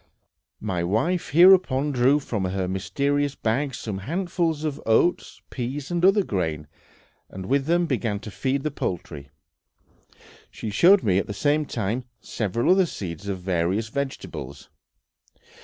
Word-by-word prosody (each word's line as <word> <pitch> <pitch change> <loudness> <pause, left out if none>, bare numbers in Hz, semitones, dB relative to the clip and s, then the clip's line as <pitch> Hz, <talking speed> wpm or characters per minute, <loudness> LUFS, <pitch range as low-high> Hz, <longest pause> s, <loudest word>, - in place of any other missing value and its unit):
My 95 -5 -2
wife 115 - 0
hereupon 160 -5 +5
drew 130 +2 +3
from 110 -8 -3
her 95 0 -2
mysterious 140 +9 -1
bag 130 +4 -1
some 105 -3 -5
handfuls 165 - -2
of 150 -2 -3
oats, 115 +10 +1
peas, 135 +4 -4
and 175 0 -1
other 195 +2 +5
grain, 80 - -2 0.6
and 95 0 -8
with 135 +4 0
them 175 +1 +2
began 115 -8 -1
to 105 - -8
feed 135 +6 -1
the 155 - -1
poultry. 80 - -5 1.2
She 110 - -6
showed 180 - +5
me 95 -3 +3
at - - -3
the 105 - -5
same 145 +7 +1
time 115 +2 -2
several 115 - -1
other 190 -1 +4
seeds 95 - -7
of 95 -2 -3
various 95 +4 -1
vegetables. 110 - -6
125 Hz, 140 wpm, -24 LUFS, 95-150 Hz, 1.2 s, hereupon